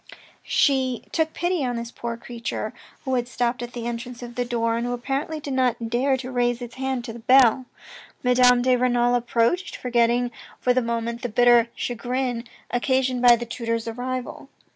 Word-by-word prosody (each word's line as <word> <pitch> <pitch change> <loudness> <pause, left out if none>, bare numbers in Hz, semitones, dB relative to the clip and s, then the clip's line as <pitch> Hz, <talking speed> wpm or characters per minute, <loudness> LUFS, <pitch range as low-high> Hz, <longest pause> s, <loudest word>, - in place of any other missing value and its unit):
She 260 -3 +2
took 320 -1 0
pity 350 -2 -1
on 245 -1 -1
this 235 0 -5
poor 235 -1 -5
creature, 235 0 -5 0.3
who 265 - -1
had 245 -1 0
stopped 245 -1 -1
at 240 0 -6
the 235 -1 -5
entrance 240 +1 -5
of 240 0 -8
the 245 - -1
door, 230 -1 0
and 235 - -1
who 245 - -2
apparently 275 +6 -3
did 285 -2 -5
not 245 -3 0
dare 265 +3 +2
to 255 0 -6
raise 245 -1 +1
its 240 -1 -8
hand 265 -2 -2
to 225 - -6
the 235 - -9
bell. 255 +1 +5 0.6
Madame 250 -1 +5
de 255 0 +4
Renal 245 -1 +2
approached, 245 +9 +1
forgetting 240 0 +1 0.3
for 250 - +2
the 255 - +2
moment 235 0 -3
the 245 - -3
bitter 240 +1 +5
chagrin 245 0 -2 0.3
occasioned 260 0 +1
by 245 -1 +8
the 240 +1 -5
tutor's 230 -1 -3
arrival. 250 +2 -5
245 Hz, 185 wpm, -24 LUFS, 235-255 Hz, 0.6 s, by